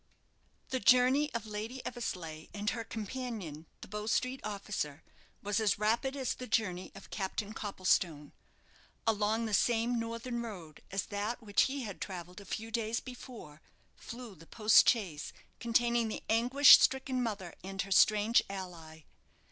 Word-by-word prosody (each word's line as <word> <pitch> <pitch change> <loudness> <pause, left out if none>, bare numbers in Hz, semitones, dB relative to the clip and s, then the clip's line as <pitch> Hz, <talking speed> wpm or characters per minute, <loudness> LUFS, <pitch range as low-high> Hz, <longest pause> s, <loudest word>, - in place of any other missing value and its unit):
The 260 - -1
journey 255 +4 +4
of 230 -2 -2
Lady 220 +4 -6
Eversleigh 165 -9 -5
and 205 0 -1
her 230 +2 -4
companion, 215 - -6
the - - -9
Bow 210 +2 -5
Street 255 +3 0
officer, 200 -8 -4 0.4
was 205 +1 0
as 215 -2 +2
rapid 230 +6 +1
as 265 -3 -1
the 255 - -8
journey 185 -5 -1
of 195 - -13
Captain 200 +1 -3
Copplestone. 185 -8 0 0.7
Along 220 +1 +1
the 220 - -3
same 235 +3 +2
northern 230 +1 -4
road 180 -9 -8
as 195 0 -2
that 215 +4 -3
which 205 -2 +3
he 275 -1 -3
had 205 -4 -7
travelled 180 0 -7
a - - -13
few 225 +4 -5
days 225 0 -1
before 240 - -11 0.3
flew 235 -2 -9
the 165 -2 -16
post 220 0 +5
chaise 185 -11 -1 0.3
containing 235 0 +2
the 215 - -5
anguish 250 +5 +8
stricken 265 -1 +1
mother 205 -7 -3
and 195 +1 -3
her 195 - -11
strange 215 +4 +5
ally. 170 -5 -8
215 Hz, 150 wpm, -32 LUFS, 195-235 Hz, 0.7 s, anguish